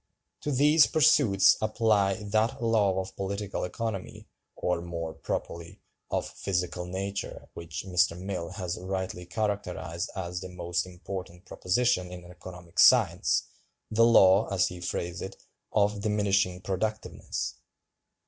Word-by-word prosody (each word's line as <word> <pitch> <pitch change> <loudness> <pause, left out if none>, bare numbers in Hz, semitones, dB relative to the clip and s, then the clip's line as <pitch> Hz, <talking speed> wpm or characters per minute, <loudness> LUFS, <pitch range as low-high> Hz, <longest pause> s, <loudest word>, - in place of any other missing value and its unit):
To 145 - -3
these 150 +3 +5
pursuits 105 -10 +5
apply 110 -2 +2
"that 110 +2 0
law 105 -5 +2
of 95 0 -9
Political 100 0 -3
Economy, 100 +1 -5 0.3
or, 90 -1 -1
more 85 -2 -5
properly, 85 +2 -5 0.3
of - - -1
physical 90 -2 -3
nature, 100 +2 -5
which 85 +2 -7
Mr. 85 -1 +2
Mill 90 -3 -4
has 90 -3 -4
rightly 95 -1 -4
characterized 100 -3 -3
as 90 -2 -4
the 95 - -7
most 85 -1 -2
important 90 0 -8
proposition 90 -1 0
in 90 -1 -9
economic 90 +1 -10
science—the 110 +1 +3
law, 100 -3 +6
as 95 -2 +2
he 90 -1 -9
phrased 85 0 -3
it, 95 - -7 0.3
of 105 0 +1
'diminishing 100 -3 +1
productiveness. 110 +4 -3
95 Hz, 120 wpm, -28 LUFS, 90-105 Hz, 0.3 s, law